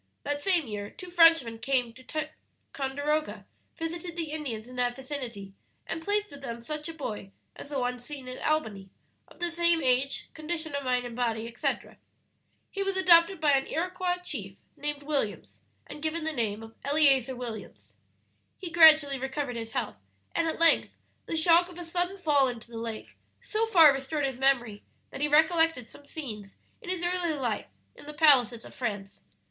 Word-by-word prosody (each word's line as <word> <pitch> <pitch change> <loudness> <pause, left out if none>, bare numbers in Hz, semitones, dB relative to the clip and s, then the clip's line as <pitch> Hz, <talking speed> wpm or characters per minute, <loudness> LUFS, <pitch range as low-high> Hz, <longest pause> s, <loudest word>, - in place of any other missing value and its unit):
"That 290 0 -2
same 355 -3 +3
year 205 -3 -5
two 365 -1 -11
Frenchmen 330 -10 +5
came 250 -3 0
to 255 - -15
Ticonderoga, 300 -1 -4 0.3
visited 335 +1 -4
the 325 -3 -4
Indians 250 -8 -4
in 250 - -11
that 245 -1 +1
vicinity, 250 -8 -6 0.3
and 325 - -5
placed 415 +2 0
with 285 - -11
them 235 -3 -6
such 305 +4 -5
a - - -6
boy 215 -10 -5 0.3
as - - -10
the 290 - -3
one 250 -1 -1
seen 265 +1 -9
at 255 - -7
Albany 215 -11 -1 0.4
of - - -19
the 345 0 -1
same 340 0 +3
age, 260 +2 0
condition 315 -1 -3
of 280 0 -2
mind 250 -1 0
and 240 -1 -7
body, 230 -2 -1
etc. 235 0 -3 0.7
"He 395 - -4
was 390 -1 -1
adopted 360 0 +6
by 305 -2 +3
an 270 -1 +2
Iroquois 360 +2 -1
chief 200 - -4 0.2
named 295 0 -5
Williams, 205 - -3 0.2
and 295 - -10
given 320 +1 -2
the 315 0 -1
name 225 -4 -2
of 225 0 -12
Eleazer 275 -3 +3
Williams. 235 -4 -8 0.6
"He 360 -4 -7
gradually 310 -4 +7
recovered 265 -1 -3
his 225 -1 -5
health, - - -2 0.4
and 330 - +1
at 320 - -2
length 330 0 +4 0.3
the - - -2
shock 340 +2 +5
of 355 - -12
a 350 - -7
sudden 355 +3 -2
fall 295 -7 +3
into 240 -1 -6
the 230 - -6
lake 225 -1 -6 0.2
so 450 +1 -1
far 330 -9 +7
restored 275 +2 -2
his 265 -2 -3
memory 240 -6 +1 0.3
that - - -7
he 295 - +2
recollected 315 -3 +3
some 285 - -15
scenes 215 -11 -8 0.2
in 405 - -9
his 365 -2 -2
early 350 -2 0
life 245 -6 -2 0.3
in - - -15
the 300 - -7
palaces 250 -7 +4
of - - -12
France. 205 -5 -5
285 Hz, 180 wpm, -28 LUFS, 245-330 Hz, 0.7 s, gradually